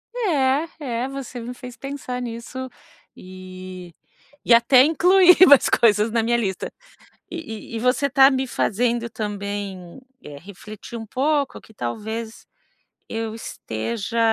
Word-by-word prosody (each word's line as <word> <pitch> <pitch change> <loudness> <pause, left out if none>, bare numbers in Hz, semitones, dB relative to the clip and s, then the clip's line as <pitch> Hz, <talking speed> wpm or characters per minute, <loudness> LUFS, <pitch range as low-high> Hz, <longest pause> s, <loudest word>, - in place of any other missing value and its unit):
É, 305 - +1
é, 250 -3 -3
você 270 -2 -7
me 240 +2 -6
fez 250 -1 -11
pensar 270 -3 -6
nisso, 245 +2 -6 0.5
e 185 -1 -10 0.5
e 235 - +5
até 240 +2 +6
incluir 360 +4 +5
mais 285 -2 +7
coisas 215 -1 +3
na 230 0 +1
minha 235 +1 +1
lista. 195 -5 -3 0.6
E 275 -10 -8
e - - -1
você, 250 +4 +1
está 270 0 +6
me 265 -1 -1
fazendo 235 +1 -1
também, 200 -2 -6 0.2
eh, 145 -1 -10
refletir 210 +6 -10
um 225 - -8
pouco, 280 +4 -1
que - - -19
talvez, 220 - -5 0.7
eu 225 -1 -4
esteja 225 - -4
235 Hz, 130 wpm, -22 LUFS, 210-265 Hz, 0.7 s, mais